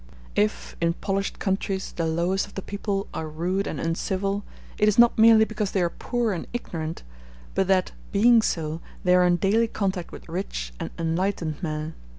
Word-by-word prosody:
If, 105 +1 0
in 170 0 +2
polished 195 +2 -2
countries, 195 -1 -1
the 165 -1 -2
lowest 175 +5 0
of 205 - -17
the 195 - -4
people 200 -1 -2
are 160 - -3
rude 180 +6 -1
and 145 - -4
uncivil, 195 +4 -1 0.4
it 210 - +4
is 210 - 0
not 240 0 +7
merely 220 0 +7
because 215 -2 -3
they 190 - +2
are 170 - 0
poor 240 -4 -1
and 175 - -5
ignorant, 165 -9 -4 0.5
but 190 - +1
that, 190 -1 +2 0.2
being 230 +3 +6
so, 160 -5 -2 0.2
they 180 - +4
are 180 0 +5
in 175 - +4
daily 205 +6 +2
contact 190 -5 -2
with - - -11
rich 160 - -4
and - - -3
enlightened 165 -1 -1
men. 155 -1 -3
190 Hz, 180 wpm, -25 LUFS, 165-205 Hz, 0.5 s, not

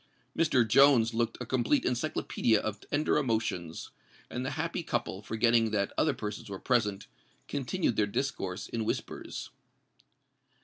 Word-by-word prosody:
Mr. 130 -8 +3
Jones 120 -2 +6
looked 115 0 0
a - - -4
complete 130 +3 +1
encyclopædia 125 -3 +1
of 105 -1 -3
tender 150 +6 0
emotions; 110 - -2 0.4
and 125 - -3
the 135 - -2
happy 165 +3 -2
couple, 120 - -2
forgetting 115 +1 +2
that 100 -2 -1
other 150 -3 +2
persons 105 -4 -6
were 100 - -5
present, 105 -4 0 0.4
continued 140 -1 -1
their 105 - +3
discourse 100 -5 -3
in 115 -1 -3
whispers. - - -4
115 Hz, 135 wpm, -30 LUFS, 105-135 Hz, 0.4 s, Jones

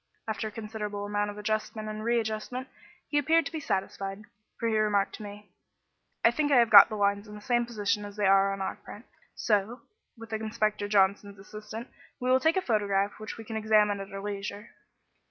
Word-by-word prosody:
After 220 0 -2
a - - -7
considerable 210 -2 -5
amount 205 0 -1
of 205 - -8
adjustment 215 0 -2
and 215 0 -5
readjustment, 235 +2 -2 0.4
he 295 - +1
appeared 320 +3 +3
to - - -5
be 320 - -4
satisfied, 195 -4 -3 0.4
for 230 - 0
he 225 - +1
remarked 210 -2 +2
to - - -12
me 205 0 -10 0.7
"I 230 - +7
think 290 +3 0
I - - +6
have 235 -2 +4
got 200 -2 +10
the 215 - -4
lines 200 0 0
in 210 - -10
the - - -9
same 240 +1 +1
position 210 -2 -1
as 205 0 -8
they 210 -1 0
are 195 0 +5
on 195 0 -4
our 190 - -3
print, 215 +5 -12 0.3
so, 215 +3 0 0.4
with 225 0 -10
Inspector 215 -1 -1
Johnson's 200 0 +2
assistance, 210 +4 -9 0.3
we 250 +1 0
will 260 - +5
take 320 +6 +2
a - - +2
photograph 205 -3 0
which 215 0 -7
we 225 - -8
can 220 0 -7
examine 215 -2 +3
at 195 0 -8
our 195 0 -6
leisure." 205 +1 -5
210 Hz, 205 wpm, -28 LUFS, 205-225 Hz, 0.7 s, got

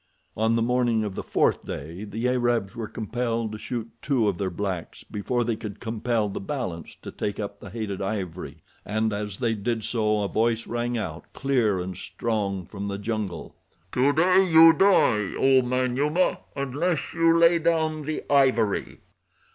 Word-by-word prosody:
On 110 +1 +2
the 115 - +2
morning 120 -2 +2
of 105 -2 -3
the - - -4
fourth - - +1
day 85 +8 -6
the 110 +4 -2
Arabs 120 -4 0
were 115 -2 -4
compelled 115 0 -2
to 110 - -7
shoot 115 0 -4
two 130 -6 +1
of 95 -4 -1
their 95 -2 0
blacks 90 -1 -4
before 120 +4 -2
they 115 -1 -1
could 105 -2 -7
compel 115 -1 -1
the 100 - -5
balance 95 - -5
to - - -7
take 100 - -4
up 100 -1 -5
the 100 - -10
hated 105 -3 -4
ivory, 90 -6 -4 0.2
and 110 +1 -1
as 105 -1 -4
they 115 -3 0
did 110 +1 -2
so 105 -2 +1
a - - 0
voice 115 +2 0
rang 120 +1 -2
out, 85 -7 -6
clear 120 -8 +1
and 90 0 -5
strong, 100 -4 -2
from 100 +2 -6
the 100 0 -3
jungle: 105 -5 -4 0.4
"Today 160 +9 +4
you 165 -2 +8
die, 130 - +3
oh, 135 -1 +5
Manyuema, 130 +7 +1 0.2
unless 145 +5 -1
you 165 0 +4
lay 170 0 +5
down 160 -1 +1
the 155 +1 -4
ivory. 130 -7 +2
115 Hz, 170 wpm, -25 LUFS, 100-130 Hz, 0.4 s, you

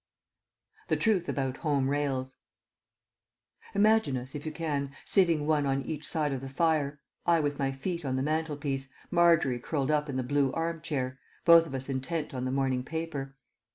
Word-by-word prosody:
THE - - +2
TRUTH 200 -6 +2
ABOUT 135 -2 -1
HOME 145 -4 +1
RAILS 135 -2 -1 1.4
Imagine 210 -9 +4
us, 125 +1 -7
if 145 +1 -6
you - - -2
can, 150 -3 -2 0.2
sitting 170 -6 +3
one 150 -2 +2
on 135 0 0
each 155 -1 -4
side 150 -3 +1
of 130 - -3
the 135 - -6
fire, 150 -1 +1 0.3
I 170 -1 +5
with 145 -1 -1
my 135 -1 +1
feet 170 +6 -4
on 130 -2 -1
the 130 - 0
mantelpiece, 145 -3 -2 0.2
Margery 170 -8 +4
curled 140 +2 -1
up 150 0 +1
in 135 - -3
the 130 - 0
blue 140 +1 +1
arm 165 0 -2
chair, 135 -5 -3 0.3
both 170 -1 +8
of 135 - -6
us 130 0 -4
intent 140 +4 -3
on 130 -1 -3
the 130 - -1
morning 130 -1 +1
paper. 145 -3 -4
145 Hz, 180 wpm, -29 LUFS, 135-160 Hz, 1.4 s, both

